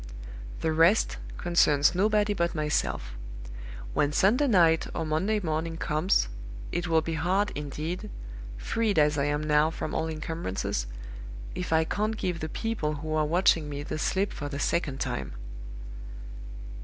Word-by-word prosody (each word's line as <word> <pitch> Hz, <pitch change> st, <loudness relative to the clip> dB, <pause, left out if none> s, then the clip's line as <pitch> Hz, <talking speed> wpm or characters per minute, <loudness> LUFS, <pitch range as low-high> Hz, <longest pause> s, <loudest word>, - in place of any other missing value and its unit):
The 160 Hz, -, +1 dB
rest 165 Hz, +7 st, +4 dB, 0.2 s
concerns 150 Hz, -4 st, +3 dB
nobody 210 Hz, +2 st, +2 dB
but 170 Hz, -3 st, -1 dB
myself. 150 Hz, -, -1 dB, 0.8 s
When 145 Hz, -, +2 dB
Sunday 220 Hz, -, +3 dB
night 170 Hz, -8 st, +4 dB
or 165 Hz, -, -1 dB
Monday 185 Hz, +8 st, +1 dB
morning 165 Hz, -2 st, -2 dB
comes, 155 Hz, -, +1 dB, 0.4 s
it 175 Hz, +1 st, -2 dB
will 160 Hz, -1 st, +3 dB
be 165 Hz, -, -3 dB
hard, 190 Hz, +6 st, +1 dB
indeed 150 Hz, +4 st, -4 dB, 0.5 s
freed 210 Hz, -, 0 dB
as 150 Hz, -1 st, +4 dB
I 140 Hz, -, +2 dB
am 145 Hz, +1 st, 0 dB
now 150 Hz, 0 st, +3 dB
from 165 Hz, -, -5 dB
all 160 Hz, -, 0 dB
incumbrances 155 Hz, -, -3 dB, 0.7 s
if 180 Hz, -, -4 dB
I 160 Hz, 0 st, +4 dB
can't 215 Hz, +6 st, -1 dB
give 180 Hz, -4 st, -2 dB
the 155 Hz, -, -4 dB
people 190 Hz, -7 st, -2 dB
who 155 Hz, +2 st, -4 dB
are 155 Hz, -1 st, +2 dB
watching 165 Hz, -2 st, +3 dB
me 145 Hz, 0 st, -4 dB
the 155 Hz, -, -4 dB
slip 195 Hz, +5 st, 0 dB
for 145 Hz, -, -5 dB
the 140 Hz, -, -4 dB
second 145 Hz, -2 st, -1 dB
time. 65 Hz, -2 st, -3 dB
160 Hz, 150 wpm, -28 LUFS, 150-180 Hz, 0.8 s, rest